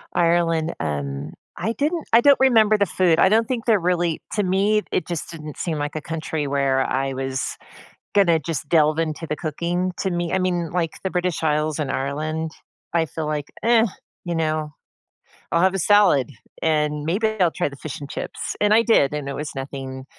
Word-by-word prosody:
Ireland, 170 -1 +2
um, 70 0 -3 0.2
I 225 - -1
didn't 310 +5 -1
I 230 - +7
don't 280 +1 +6
remember 220 -5 +5
the 200 - +3
food. 175 -2 +2
I 190 - +6
don't 225 +1 +3
think 245 -3 -3
they're 220 -4 +4
really 175 -2 0
to 210 - +1
me, 200 +3 +2
it - - -1
just 170 -1 -4
didn't 155 -3 -8
seem 165 -3 -2
like 145 +1 -3
a 155 - -3
country 155 -1 -3
where 135 -1 +1
I 135 0 -1
was 135 0 -3 0.6
gonna 175 -5 +4
just 150 -2 -4
delve 155 -1 +3
into 165 0 -3
the 150 - -2
cooking 175 +4 -2
to 190 - 0
me. 175 -1 -2
I 190 - +2
mean, 175 -3 -1
like, 165 -2 -1
the 190 - -2
British 180 -2 -1
Isles 155 0 0
in 145 - -2
Ireland, 155 +4 -2 0.4
I 165 -1 +2
feel 155 +3 -5
like, 150 -1 -2 0.2
eh, 230 0 +5 0.4
you 175 - -2
know? 155 -2 -1 0.8
I'll 170 - +3
have 190 0 +3
a 195 - -1
salad, 200 -9 +4 0.3
and 150 -2 +1
maybe 195 +8 +1
I'll 175 - +4
try - - -1
the 140 - -8
fish 145 +1 -7
and 145 - -8
chips. - - -5
And 210 0 +4
I 230 - +5
did, 150 - +3
and 150 -2 -4
it 140 - -4
was 150 +1 -4
nothing 135 -1 -6
165 Hz, 200 wpm, -22 LUFS, 150-185 Hz, 0.8 s, I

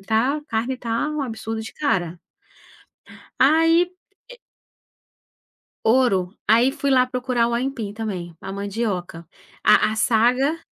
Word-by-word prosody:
tá 230 +8 0
carne 240 +1 -2
tá 235 +5 -2
um 305 0 -3
absurdo 225 -3 -5
de 220 - -8
cara. 195 - 0 1.3
Aí 325 +5 +4 0.4
pi - - -10
eh - - -25 1.5
ouro, 220 -7 +3 0.2
aí 235 +4 +4
fui 280 -1 -2
lá 255 -1 +5
procurar 250 -2 0
o 235 - -2
aipim 235 -4 -3
também, 185 -6 -5
a 195 - -6
mandioca. 200 -4 -4 0.4
A - - +5
a - - -3
saga 245 +7 +2
235 Hz, 130 wpm, -22 LUFS, 215-265 Hz, 1.5 s, lá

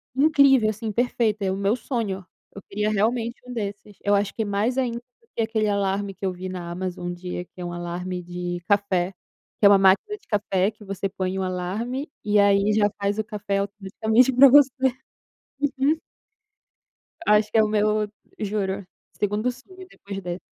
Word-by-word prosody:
Incrível, 275 -5 +5
assim, 215 +1 -3
perfeita. 220 -2 0
É 190 - +1
o - - -1
meu 200 +3 +1
sonho, 220 -6 -3 0.3
eu 200 - -8
queria 210 +1 -2
realmente 230 +3 0
um 250 - -8
desses, 205 -2 -5
eu 205 0 +3
acho 200 0 0
que 225 - -1
mais 210 +5 0
ainda 245 -3 0
do 250 - -16
que - - 0
aquele 220 -1 0
alarme 200 0 0
que 195 +1 -6
eu 190 - +1
vi 185 +1 -6
na 175 -2 -6
Amazon 180 0 -4
um 175 - -2
dia, 180 0 -6
que - - -44
é 175 - -4
um 175 - -4
alarme 175 +1 -4
de 175 0 -4
café, 195 -3 +1 0.5
que 205 - +3
é - - +11
uma 200 - +7
máquina 195 - +3
de - - -30
café 200 -2 +1
que 215 0 -17
você 195 0 -3
põe 190 -1 -3
o 190 - -1
alarme 210 - -3
e 210 0 +3
aí 200 +1 +4
já 205 -1 +3
faz 200 +1 -1
o 220 - +1
café 205 -2 -3
automaticamente 220 +5 +1
para 270 +2 +8
você. 280 0 +7 1.1
Uhum. 295 +4 +2 1.3
Acho 210 0 +4
que - - +2
é 220 - +6
o - - +1
meu 210 0 +1 0.3
juro, 200 -2 -2 0.3
segundo 210 +4 0
sonho 370 +9 -14
depois 200 - -8
dessa. 175 0 -5
205 Hz, 190 wpm, -24 LUFS, 190-225 Hz, 1.3 s, é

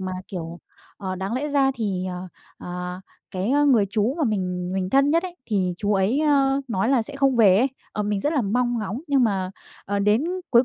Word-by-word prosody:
mà, 185 0 -4 0.2
kiểu, 170 -2 -6 0.4
ờ, 190 -2 -4
đáng 190 +3 -4
lẽ 280 +4 -2
ra 280 -2 +3
thì 195 -6 -2
ờ, 180 0 -5 0.3
ờ, 180 +1 -6 0.3
cái, 190 +4 -2
ơ, 290 +2 +3
người 235 -8 +4
chú 220 +5 +1
mà 315 - +2
mình 180 -5 -2
mình 185 -1 -2
thân 275 +4 +4
nhất 335 +2 +3
ấy 360 -1 -7
thì 190 -5 0
chú 205 0 0
ấy, 200 +9 +2
ơ, 280 -2 +3
nói 205 -1 0
là 260 -3 +3
sẽ 280 +5 -9
không 275 -2 +2
về 200 -5 +6
ấy. 250 - +4 0.3
Ờ, 210 - -2
mình 205 -1 -1
rất 295 - 0
là 280 -6 +1
mong 240 +3 0
ngóng 215 +3 -4
nhưng 275 -3 +3
mà, 190 -4 0 0.3
ờ, 200 +1 -1
đến 210 +7 +2 0.3
cuối 240 0 +6
210 Hz, 225 wpm, -23 LUFS, 190-270 Hz, 0.4 s, về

